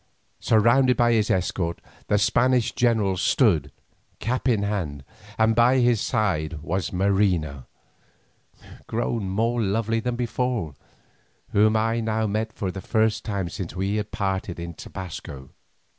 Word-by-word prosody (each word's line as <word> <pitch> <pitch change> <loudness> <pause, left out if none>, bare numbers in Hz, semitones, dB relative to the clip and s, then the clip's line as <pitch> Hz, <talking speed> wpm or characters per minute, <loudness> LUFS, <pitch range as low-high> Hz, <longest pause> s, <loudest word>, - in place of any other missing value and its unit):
Surrounded 120 +3 +4
by 120 0 +4
his 110 -2 +2
escort, 85 -2 -1 0.3
the 105 - +2
Spanish 125 +3 +2
general 110 -6 +1
stood, 95 - +2 0.5
cap 125 +2 -1
in 110 -4 +2
hand, 85 -10 -3 0.3
and 110 0 +3
by 120 +3 +5
his 120 -3 +3
side 85 - -1
was 90 +4 -2
Marina, 90 -8 0 1.2
grown 115 -3 -2
more 115 +5 0
lovely 110 +2 0
than 125 +2 -2
before, 120 - -2 0.8
whom 110 +2 +4
I 115 +1 +1
now 110 -1 0
met 110 +2 -2
for 95 -4 -4
the 95 - -7
first 110 0 +1
time 100 -4 -2
since 85 +1 -6
we 95 +3 -1
had 105 0 -3
parted 95 -3 -3
in 85 0 -6
Tobasco. 75 -7 -8
105 Hz, 135 wpm, -24 LUFS, 95-115 Hz, 1.2 s, by